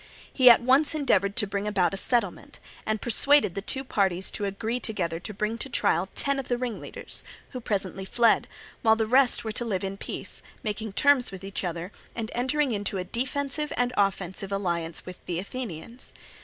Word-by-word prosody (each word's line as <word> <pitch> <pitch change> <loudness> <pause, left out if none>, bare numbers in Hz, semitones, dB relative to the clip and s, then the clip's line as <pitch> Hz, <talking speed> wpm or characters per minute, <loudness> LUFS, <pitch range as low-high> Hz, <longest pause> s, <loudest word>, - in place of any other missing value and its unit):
He 255 -2 +7
at 235 - +8
once 275 +5 +4
endeavoured 200 -9 +2
to 235 - +4
bring 200 +1 -3
about 190 -4 +2
a - - -1
settlement, 210 -3 0 0.3
and 215 0 0
persuaded 275 -1 +4
the 195 - -4
two 265 +6 0
parties 190 -7 0
to 205 - -3
agree 220 +5 -2
together 180 -8 -2
to 200 - -6
bring 215 +3 -2
to 270 - -3
trial 185 -6 +1
ten 280 -1 +1
of 265 - -5
the 245 - 0
ringleaders, 245 -3 -4 0.3
who 255 - -6
presently 195 -4 -2
fled, 230 +4 +3 0.3
while 220 -3 +5
the 225 0 0
rest 255 +3 +4
were 220 - -3
to 225 - -3
live 200 -6 -2
in 195 0 -4
peace, - - -3 0.2
making 215 -1 -3
terms 285 -1 +4
with 190 -1 -9
each 195 0 -4
other, 175 +1 -4 0.2
and 225 -1 -4
entering 260 +3 +1
into 205 -2 -2
a 185 - -2
defensive 275 - -1
and 245 0 +1
offensive 195 -1 0
alliance 170 -4 -2
with 185 -1 -10
the 175 - -2
Athenians. 230 +2 -6
215 Hz, 190 wpm, -27 LUFS, 195-250 Hz, 0.3 s, at